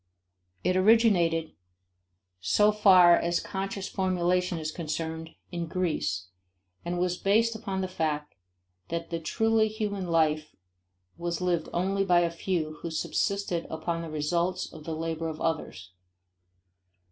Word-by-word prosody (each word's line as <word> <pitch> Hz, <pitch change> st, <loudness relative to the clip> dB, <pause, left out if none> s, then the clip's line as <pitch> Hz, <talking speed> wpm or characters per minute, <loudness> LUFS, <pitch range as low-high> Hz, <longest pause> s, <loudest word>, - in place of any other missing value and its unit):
It 185 Hz, -, +2 dB
originated, 185 Hz, -6 st, +4 dB, 0.9 s
so 210 Hz, -, +3 dB
far 185 Hz, -5 st, +7 dB
as 170 Hz, 0 st, 0 dB
conscious 195 Hz, 0 st, -4 dB
formulation 180 Hz, -1 st, 0 dB
is 155 Hz, -1 st, -3 dB
concerned, 160 Hz, 0 st, -4 dB, 0.2 s
in 170 Hz, -2 st, -3 dB
Greece, 125 Hz, -, -2 dB, 0.5 s
and 175 Hz, +1 st, -3 dB
was 180 Hz, 0 st, 0 dB
based 225 Hz, +3 st, +2 dB
upon 200 Hz, -4 st, -3 dB
the 185 Hz, -, -1 dB
fact 155 Hz, -4 st, -2 dB, 0.5 s
that 165 Hz, 0 st, -4 dB
the 165 Hz, -, -1 dB
truly 220 Hz, +6 st, +2 dB
human 210 Hz, -3 st, -3 dB
life 155 Hz, -2 st, +1 dB, 0.6 s
was 170 Hz, 0 st, -2 dB
lived 175 Hz, -3 st, 0 dB
only 195 Hz, +3 st, 0 dB
by 175 Hz, -2 st, +4 dB
a 170 Hz, -1 st, +1 dB
few 165 Hz, -3 st, -2 dB
who 170 Hz, -, -4 dB
subsisted 180 Hz, +2 st, -1 dB
upon 165 Hz, +1 st, -3 dB
the 165 Hz, -, -6 dB
results 170 Hz, +4 st, -1 dB
of 155 Hz, -, -11 dB
the 160 Hz, -, -3 dB
labor 165 Hz, 0 st, -3 dB
of 155 Hz, -, -7 dB
others. 145 Hz, -, -3 dB
175 Hz, 135 wpm, -28 LUFS, 160-190 Hz, 0.9 s, far